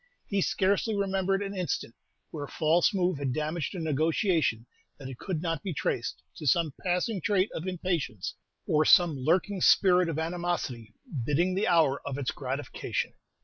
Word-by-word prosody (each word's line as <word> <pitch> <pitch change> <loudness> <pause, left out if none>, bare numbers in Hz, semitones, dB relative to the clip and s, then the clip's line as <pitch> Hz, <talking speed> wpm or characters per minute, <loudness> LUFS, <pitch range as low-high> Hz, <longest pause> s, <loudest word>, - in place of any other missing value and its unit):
He 200 -1 0
scarcely 200 +4 +1
remembered 195 0 0
an 200 0 -5
instant 175 -10 -2 0.4
where 145 -3 -5
a - - -14
false 165 +2 +3
move 180 -5 0
had 135 -3 -1
damaged 155 +5 -2
a - - -4
negotiation 160 - +1 0.3
that 135 - -8
it 130 - -9
could 175 -4 -3
not 165 -3 -1
be 185 -5 -4
traced - - -2
to 150 - -5
some 160 0 +3
passing 180 +3 0
trait 200 +2 +1
of 165 - -5
impatience, 175 - -2 0.3
or 155 0 +3
some 170 0 +6
lurking 180 +8 +1
spirit 180 -2 +5
of 160 - -3
animosity 160 -10 -3
biding 150 +7 0
the 195 +3 0
hour 160 -6 +3
of 140 -1 -4
its 140 -3 -1
gratification. 135 +1 -3
170 Hz, 165 wpm, -28 LUFS, 145-185 Hz, 0.4 s, some